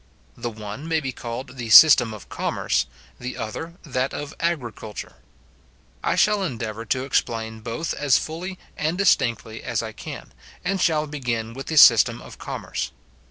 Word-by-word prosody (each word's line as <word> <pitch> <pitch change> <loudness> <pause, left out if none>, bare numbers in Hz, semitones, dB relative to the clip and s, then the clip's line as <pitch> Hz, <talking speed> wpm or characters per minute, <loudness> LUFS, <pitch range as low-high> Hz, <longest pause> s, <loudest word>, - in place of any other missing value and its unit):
The 120 - -4
one 110 +6 -8
may 160 -1 +1
be 135 -3 -3
called 125 +2 -7
the 120 -2 -5
system 120 -2 +9
of 105 -3 -10
commerce, - - -1 0.3
the 125 +1 -5
other 160 +10 -5
that 130 -3 -2
of 145 -1 -5
agriculture. 120 -10 -4 0.9
I - - +1
shall 210 -1 +3
endeavour 115 - -4
to 130 +4 0
explain 110 -4 -1
both 115 +9 -3
as 145 -3 +3
fully 180 +4 -5 0.2
and 160 +3 -1
distinctly 115 - +1
as 120 -3 -2
I 110 - -5
can, 110 - -9 0.3
and 195 0 0
shall 155 -3 +2
begin 120 -6 -3
with 135 +2 -8
the 160 - -2
system 115 -3 +7
of - - -12
commerce. - - -4
130 Hz, 160 wpm, -23 LUFS, 115-155 Hz, 0.9 s, system